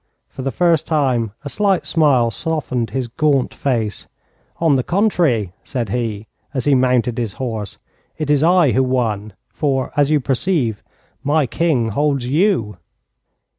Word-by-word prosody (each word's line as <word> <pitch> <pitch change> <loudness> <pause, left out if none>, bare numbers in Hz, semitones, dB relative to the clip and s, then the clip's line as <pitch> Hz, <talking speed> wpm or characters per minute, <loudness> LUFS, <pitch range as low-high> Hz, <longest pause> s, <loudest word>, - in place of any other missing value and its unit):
For - - -9
the 135 - -1
first 165 +1 +1
time 130 -8 +1
a - - -2
slight 195 +3 +1
smile 135 -8 +3
softened 130 -5 -2
his 130 -2 -3
gaunt 135 +2 +1
face. 115 -7 -2 0.5
'On 160 -4 +3
the 130 - +2
contrary,' 165 - +1
said 120 -6 -3
he, 110 -2 -3 0.3
as 130 - -1
he 145 - +4
mounted 125 -2 +2
his 115 -5 -2
horse, 110 -5 -5 0.4
'it 155 - -3
is 145 -2 +3
I 170 -4 +4
who 130 - +2
won, 115 -5 -1 0.2
for, 135 -4 -1
as 145 -1 +3
you 155 -1 +3
perceive, 130 - -1 0.4
my 150 +1 +2
King 130 -5 0
holds 140 +1 0
you.' 145 - +1
130 Hz, 150 wpm, -19 LUFS, 115-155 Hz, 0.5 s, he